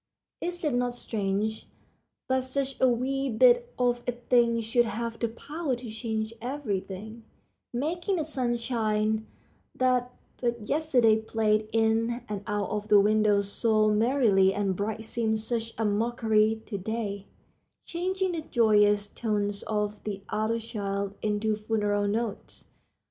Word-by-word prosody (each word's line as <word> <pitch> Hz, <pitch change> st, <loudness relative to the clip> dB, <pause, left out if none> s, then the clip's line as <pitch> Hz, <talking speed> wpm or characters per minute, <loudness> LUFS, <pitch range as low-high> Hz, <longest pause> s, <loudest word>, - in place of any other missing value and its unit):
Is 350 Hz, 0 st, -3 dB
it 300 Hz, -4 st, +1 dB
not 245 Hz, 0 st, 0 dB
strange 215 Hz, -1 st, -2 dB, 0.6 s
that 260 Hz, 0 st, +1 dB
such 270 Hz, 0 st, -3 dB
a 260 Hz, -, +6 dB
wee 270 Hz, +3 st, 0 dB
bit 485 Hz, -, +4 dB
of 245 Hz, -1 st, +1 dB
a 245 Hz, -, +1 dB
thing 240 Hz, -1 st, +2 dB
should 240 Hz, +2 st, +2 dB
have 230 Hz, +1 st, -4 dB
the 235 Hz, -, +1 dB
power 285 Hz, +5 st, -3 dB
to 240 Hz, -2 st, -8 dB
change 220 Hz, -1 st, -3 dB
every 245 Hz, -5 st, -2 dB
thing, 210 Hz, +4 st, -9 dB, 0.5 s
making 335 Hz, +10 st, -1 dB
the 325 Hz, -, 0 dB
sunshine 230 Hz, -5 st, -1 dB, 0.5 s
that 250 Hz, -1 st, +1 dB, 0.3 s
but 235 Hz, -3 st, -2 dB
yesterday 255 Hz, -8 st, +3 dB
played 215 Hz, -1 st, 0 dB
in 225 Hz, +2 st, +1 dB
and 205 Hz, -2 st, -4 dB
out 205 Hz, -2 st, -1 dB
of 210 Hz, 0 st, -3 dB
the 210 Hz, -1 st, +7 dB
windows 205 Hz, -1 st, +3 dB
so 215 Hz, -1 st, +3 dB
merrily 210 Hz, -5 st, +3 dB
and 200 Hz, -2 st, 0 dB
bright 220 Hz, +3 st, -3 dB
seem 220 Hz, -1 st, 0 dB
such 225 Hz, +1 st, -3 dB
a 225 Hz, -, 0 dB
mockery 220 Hz, 0 st, +2 dB
to 200 Hz, -3 st, -4 dB
day, 200 Hz, -1 st, -4 dB, 0.6 s
changing 375 Hz, +2 st, -1 dB
the 335 Hz, -2 st, -3 dB
joyous 210 Hz, -6 st, +3 dB
tones 205 Hz, -2 st, -2 dB
of 210 Hz, -1 st, -2 dB
the 200 Hz, -2 st, -5 dB
other 220 Hz, +2 st, 0 dB
children 200 Hz, -3 st, -3 dB
into 215 Hz, 0 st, 0 dB
funeral 210 Hz, -1 st, 0 dB
notes? 215 Hz, 0 st, -4 dB
225 Hz, 140 wpm, -28 LUFS, 210-245 Hz, 0.6 s, the